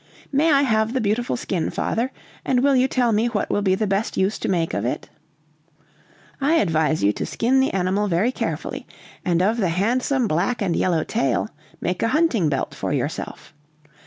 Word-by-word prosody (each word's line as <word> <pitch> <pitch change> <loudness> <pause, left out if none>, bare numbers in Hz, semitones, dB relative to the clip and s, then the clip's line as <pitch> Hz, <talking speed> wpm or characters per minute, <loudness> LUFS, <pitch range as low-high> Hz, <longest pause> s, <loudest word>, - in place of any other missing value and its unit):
"May 300 +4 +3
I 280 -1 +4
have 220 -2 +1
the 260 - +1
beautiful 225 +3 0
skin, 185 -8 -2
father? 240 +4 -1 0.3
And 255 -1 +1
will 280 -1 +4
you 255 0 +4
tell 245 -3 +1
me 220 +2 +2
what 225 -4 -2
will 205 - +1
be 190 -2 +2
the 215 - -1
best 195 +2 -1
use 190 +3 +1
to - - -2
make 170 -3 0
of 100 - -1
it?" 120 - -3 1.3
"I 295 +4 +3
advise 160 - +1
you 100 +1 +4
to - - -4
skin 255 +3 +1
the 265 - +3
animal 195 +2 0
very 195 +7 +1
carefully, - - -4 0.4
and 175 0 +1
of 215 +4 +2
the 195 -6 +1
handsome 240 +8 +1
black 195 +9 0
and 190 -6 0
yellow 170 -4 +1
tail 120 -6 0 0.3
make 180 0 -2
a - - +2
hunting 240 - +2
belt 140 - -2
for - - -4
yourself. - - -4
210 Hz, 190 wpm, -22 LUFS, 180-250 Hz, 1.3 s, I